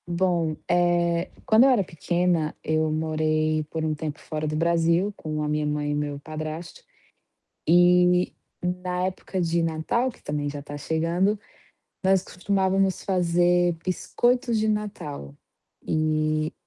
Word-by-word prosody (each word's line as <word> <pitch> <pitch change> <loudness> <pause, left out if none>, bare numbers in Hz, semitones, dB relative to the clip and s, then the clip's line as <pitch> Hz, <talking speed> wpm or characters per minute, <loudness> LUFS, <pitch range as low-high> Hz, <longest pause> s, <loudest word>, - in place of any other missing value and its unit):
Bom, 170 -3 0
eh, 175 0 +2 0.2
quando 220 +2 +6
eu - - +6
era 240 -7 +4
pequena, 170 -1 0
eu 155 0 +1
morei 155 0 0
por 160 0 -3
um 155 - 0
tempo 150 0 -5
fora 155 -1 -4
do 155 - -2
Brasil 170 +4 +2
com 155 -4 -4
a - - -1
minha 150 0 0
mãe 150 0 -1
e - - 0
o - - -1
meu 145 -1 -3
padrasto 155 +2 -7 0.9
e 180 +1 +5 0.3
na 180 0 -2
época 185 0 -4
de 170 0 +1
Natal, 165 +11 0
que, - - -21
também, 145 0 -2
já 145 0 -6
tá 145 +1 -8
chegando, 170 +7 0 0.6
nós 190 0 +3
costumávamos 190 0 0
fazer 175 -1 +2
biscoitos 240 +6 +1
de 220 - +1
Natal. 200 - -4 0.5
E 155 0 0
170 Hz, 140 wpm, -25 LUFS, 155-180 Hz, 0.9 s, quando